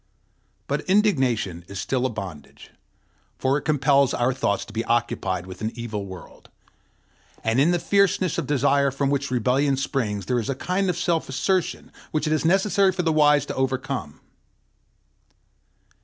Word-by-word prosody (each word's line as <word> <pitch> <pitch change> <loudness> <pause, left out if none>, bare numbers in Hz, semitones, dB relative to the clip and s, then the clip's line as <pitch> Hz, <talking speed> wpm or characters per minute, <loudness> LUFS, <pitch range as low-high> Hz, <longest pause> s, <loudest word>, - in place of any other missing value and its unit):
But - - -1
indignation 130 - +1
is 100 0 -7
still 130 +5 0
a - - -5
bondage, 95 -9 -9 0.7
for 135 +2 +1
it - - -11
compels 140 -2 +2
our 125 +2 +1
thoughts 100 -6 -1
to 105 - -13
be 115 +1 -1
occupied 115 -6 -1
with 95 +1 -10
an 110 +1 -2
evil 110 -4 -5
world; 95 -1 -12 0.9
and 115 +3 +1
in 145 +5 +4
the 175 - +2
fierceness 195 -1 +1
of - - -4
desire 140 0 +2
from 140 +1 -1
which 140 0 -1
rebellion 130 +3 +1
springs 110 -8 -2
there 125 +3 0
is 115 - -4
a 135 - -1
kind 185 +7 -1
of 175 - -1
self 170 -3 0
assertion 175 +7 -1 0.2
which 155 0 -1
it 155 - +1
is 155 - 0
necessary 195 +2 +3
for 180 -1 -2
the 165 -1 +1
wise 150 -1 +4
to - - -5
overcome. 130 - -2
135 Hz, 165 wpm, -24 LUFS, 115-155 Hz, 0.9 s, in